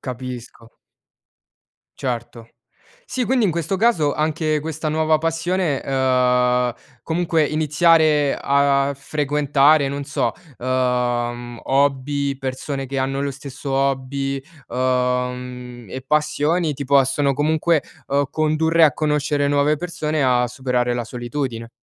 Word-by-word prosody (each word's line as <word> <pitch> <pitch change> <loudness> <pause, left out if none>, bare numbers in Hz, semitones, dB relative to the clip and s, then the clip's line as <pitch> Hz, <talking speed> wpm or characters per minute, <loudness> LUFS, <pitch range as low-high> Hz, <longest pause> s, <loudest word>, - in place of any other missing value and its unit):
Capisco. 125 -2 -8 1.3
Certo. 120 -2 -5 0.6
Sì, 255 -1 -2
quindi 250 -2 +2
in 195 - +3
questo 170 +3 -2
caso 185 -9 +2
anche 155 0 0
questa 155 0 -4
nuova 155 0 +2
passione 165 -1 -1
uhm, 125 -2 +2 0.3
comunque 165 -1 +1
iniziare 155 -1 +3
a 140 0 +2
frequentare 145 0 +2
non 140 +1 -4
so, 145 - -1 0.3
uhm, 120 -1 -1
hobby, 140 0 +1
persone 135 +1 -4
che 135 +1 -3
hanno 135 +1 -1
lo 140 - -1
stesso 140 0 -7
hobby, 135 0 -1 0.3
uhm, 125 -1 -2
e 130 - -6
passioni 150 +2 +1
ti 140 +1 -5
possono 140 +1 +3
comunque, 155 +2 +1 0.3
uhm, 140 +1 +2
condurre 160 +1 +3
a 145 - +4
conoscere 150 -1 0
nuove 145 +1 +2
persone, 155 -2 -2
a 125 -1 +3
superare 125 -1 -1
la 120 -1 -2
solitudine. 120 -1 -4
140 Hz, 115 wpm, -21 LUFS, 125-155 Hz, 1.3 s, a